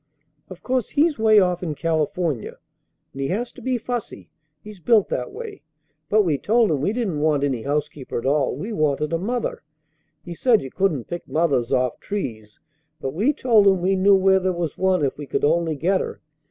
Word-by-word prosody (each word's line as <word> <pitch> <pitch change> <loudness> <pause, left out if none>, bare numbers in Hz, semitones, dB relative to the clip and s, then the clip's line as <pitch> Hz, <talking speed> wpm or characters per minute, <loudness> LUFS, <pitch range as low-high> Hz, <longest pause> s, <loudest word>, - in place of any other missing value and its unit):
Of 185 -2 -11
course 255 -3 -1
he's 300 -2 +1
way 220 -1 +6
off 180 -2 +1
in 160 -4 -3
California, 160 -4 -2 0.6
and 135 - -6
he 135 - 0
has 230 - -2
to - - -14
be 255 -1 -1
fussy. 240 0 -6 0.3
He's 210 -2 -12
built 215 +2 +3
that 125 - -3
way. - - -8 0.5
But 215 0 +4
we 155 -7 0
told 225 -2 +2
him 145 -3 0
we 175 - +1
didn't 215 -10 -2
want 150 -2 +1
any 135 -5 -1
housekeeper 145 0 -3
at 120 - -4
all, 140 -1 +1
we 200 - -5
wanted 150 -2 0
a 165 - +1
mother. 235 +5 -3 0.6
He 175 - -6
said 225 +4 +2
you 135 - -8
couldn't 180 -10 0
pick 175 - -6
mothers 140 -7 0
off 125 -1 0
trees, 110 - -6 0.4
but 135 -3 -4
we 215 - +2
told 230 -8 +3
him 190 -1 +4
we 190 +2 +1
knew 195 +1 +5
where 190 0 +4
there 185 0 0
was 170 -3 -3
one 185 -5 +1
if 135 - -2
we 145 - -6
could 135 - 0
only 165 +1 +1
get 185 +6 +1
her. - - -6
175 Hz, 205 wpm, -22 LUFS, 145-205 Hz, 0.6 s, way